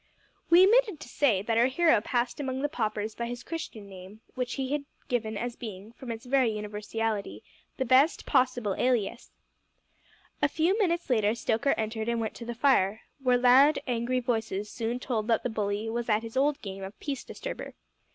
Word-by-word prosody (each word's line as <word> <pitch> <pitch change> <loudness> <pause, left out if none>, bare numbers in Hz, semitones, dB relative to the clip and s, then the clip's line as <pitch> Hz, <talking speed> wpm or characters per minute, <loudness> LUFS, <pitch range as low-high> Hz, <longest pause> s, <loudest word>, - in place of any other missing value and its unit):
We 350 +2 +8
omitted 430 -5 +3
to - - -10
say 245 -7 +2
that 225 +1 +1
our 240 - +5
hero 310 -2 +3
passed 240 +3 -1
among 265 -1 -3
the 295 - +1
paupers 215 -5 -2
by 235 +1 -4
his 245 0 -6
Christian 235 -11 -6
name, 190 +2 -12
which 250 -2 -3
he 265 -1 -3
had 290 -1 -1 0.2
given 220 -3 -1
as 240 +2 -3
being, 210 -2 -8
from 245 0 -8
its 225 +2 -7
very 260 -1 +3
universality, 210 0 -3 0.3
the 260 - -1
best 265 +6 +4
possible 245 -5 +1
alias. 240 -2 0 1.1
A 290 - +5
few 325 +6 +1
minutes 345 -4 +1
later 215 -2 +2
Stoker 235 +4 +1
entered 220 0 -2
and 235 0 0
went 220 -1 -2
to 235 - -8
the 240 0 -5
fire, 220 -5 +2 0.2
where 250 -2 +3
loud, 260 +4 +6
angry 245 0 0
voices 220 -4 -2
soon 235 +1 -3
told 225 -4 -2
that 230 -2 +2
the 250 - -1
bully 210 0 -2
was 235 +1 -3
at 215 +1 +2
his 230 +1 -8
old 280 +2 +2
game 195 -1 -6
of 195 +2 -9
peace 275 -4 -4
disturber. - - -7
235 Hz, 190 wpm, -28 LUFS, 220-265 Hz, 1.1 s, We